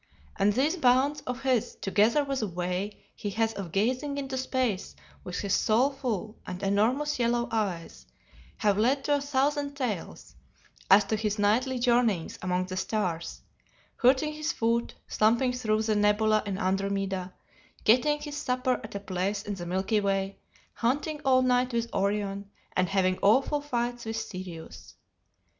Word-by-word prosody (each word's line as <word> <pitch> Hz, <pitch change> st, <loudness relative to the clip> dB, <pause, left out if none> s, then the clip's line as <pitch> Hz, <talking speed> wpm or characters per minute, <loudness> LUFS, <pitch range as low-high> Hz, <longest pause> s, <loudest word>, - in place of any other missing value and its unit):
And 205 Hz, -, +3 dB
these 285 Hz, -, +2 dB
bounds 275 Hz, 0 st, +3 dB
of 250 Hz, +1 st, -4 dB
his, 255 Hz, -4 st, +1 dB
together 215 Hz, +8 st, +2 dB
with 275 Hz, -2 st, -2 dB
a 215 Hz, -, -1 dB
way 180 Hz, +3 st, -3 dB, 0.2 s
he 205 Hz, -, -4 dB
has 225 Hz, 0 st, +2 dB
of 190 Hz, -6 st, -6 dB
gazing 255 Hz, -, 0 dB
into 270 Hz, -1 st, -3 dB
space 255 Hz, -6 st, -1 dB, 0.3 s
with 180 Hz, -, -5 dB
his 200 Hz, -2 st, -1 dB
soulful 235 Hz, -3 st, 0 dB
and 185 Hz, +2 st, -6 dB
enormous 245 Hz, +9 st, +1 dB
yellow 235 Hz, 0 st, +1 dB
eyes, 175 Hz, -, -3 dB, 0.5 s
have 205 Hz, -1 st, +2 dB
led 265 Hz, +5 st, +2 dB
to 290 Hz, -, +1 dB
a -, -, -4 dB
thousand 285 Hz, +1 st, 0 dB
tales 235 Hz, -, -4 dB, 0.6 s
as 200 Hz, +2 st, +8 dB
to 200 Hz, +2 st, -1 dB
his 215 Hz, -1 st, -1 dB
nightly 235 Hz, +6 st, +2 dB
journeyings 235 Hz, -7 st, +1 dB
among 185 Hz, 0 st, 0 dB
the 185 Hz, 0 st, -6 dB
stars; 185 Hz, -3 st, -2 dB, 0.6 s
hurting 270 Hz, +4 st, +3 dB
his 305 Hz, +1 st, -2 dB
foot 230 Hz, +1 st, 0 dB
slumping 235 Hz, +4 st, +2 dB
through 220 Hz, -3 st, 0 dB
the 215 Hz, -1 st, +1 dB
nebula 210 Hz, +1 st, +3 dB
in 195 Hz, -2 st, -2 dB
Andromeda; 195 Hz, -1 st, -1 dB, 0.5 s
getting 275 Hz, +7 st, +4 dB
his 295 Hz, -1 st, -6 dB
supper 255 Hz, -2 st, 0 dB
at -, -, -9 dB
a -, -, -2 dB
place 200 Hz, +1 st, -2 dB
in 205 Hz, -, -4 dB
the 175 Hz, -3 st, -6 dB
milky 190 Hz, +4 st, +1 dB
way, 195 Hz, 0 st, -1 dB, 0.3 s
hunting 290 Hz, +5 st, -1 dB
all 260 Hz, -2 st, +4 dB
night 250 Hz, 0 st, +2 dB
with 235 Hz, 0 st, -2 dB
Orion, 200 Hz, 0 st, -1 dB, 0.3 s
and 185 Hz, 0 st, +2 dB
having 185 Hz, -1 st, +1 dB
awful 270 Hz, +8 st, +3 dB
fights 240 Hz, -4 st, -2 dB
with 225 Hz, 0 st, -3 dB
Sirius. 185 Hz, -6 st, -8 dB
220 Hz, 155 wpm, -28 LUFS, 195-255 Hz, 0.6 s, as